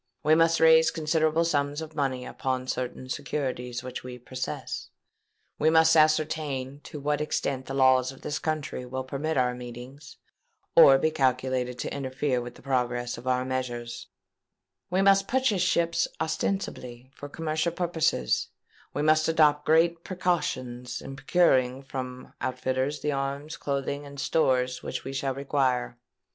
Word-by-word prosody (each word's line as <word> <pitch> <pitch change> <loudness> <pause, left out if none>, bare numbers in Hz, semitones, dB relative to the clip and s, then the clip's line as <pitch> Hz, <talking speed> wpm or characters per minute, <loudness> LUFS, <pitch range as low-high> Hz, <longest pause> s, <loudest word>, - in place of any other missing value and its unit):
We 155 +1 +4
must 165 +1 +4
raise 160 0 +6
considerable 160 +1 +1
sums 145 -2 0
of 160 -1 -7
money 130 -4 -1
upon 130 -1 -3
certain 130 0 -4
securities 130 -3 -3
which 130 0 -6
we 125 -1 -7
possess; 125 +1 -5 0.7
we 155 - +4
must 160 0 +5
ascertain 155 -3 +1
to 150 - -7
what 145 +1 -1
extent 135 -3 -2
the 135 - -4
laws 130 -1 +4
of 135 - -14
this 150 -1 -3
country 155 -5 -3
will 130 +1 -4
permit 140 +4 -3
our 125 -1 +2
meetings, 125 +3 -10 0.6
or 135 -1 +9
be 155 +4 +1
calculated 130 -2 0
to - - -4
interfere 130 -1 -1
with 120 0 -8
the - - -16
progress 120 -3 -1
of 125 - -11
our 125 0 +1
measures; 120 -2 -4 0.8
we 185 +2 +2
must 195 0 +5
purchase 255 -7 +1
ships 170 -2 +2
ostensibly 130 -7 -3
for 145 - -9
commercial 155 +2 -1
purposes; 165 - 0
and - - -33
we 145 - 0
must 155 0 +4
adopt 150 -2 +3
great 165 +1 +3
precautions 130 -10 -2
in 135 - -8
procuring 135 -5 +2
from 130 -1 -7
outfitters 130 +2 -1
the 150 - 0
arms, 140 +2 -3
clothing, 140 +1 -3
and 140 0 -10
stores 130 -4 +1
which - - -5
we 135 - -6
shall 135 -1 -2
require. 130 -3 0
140 Hz, 150 wpm, -27 LUFS, 130-155 Hz, 0.8 s, or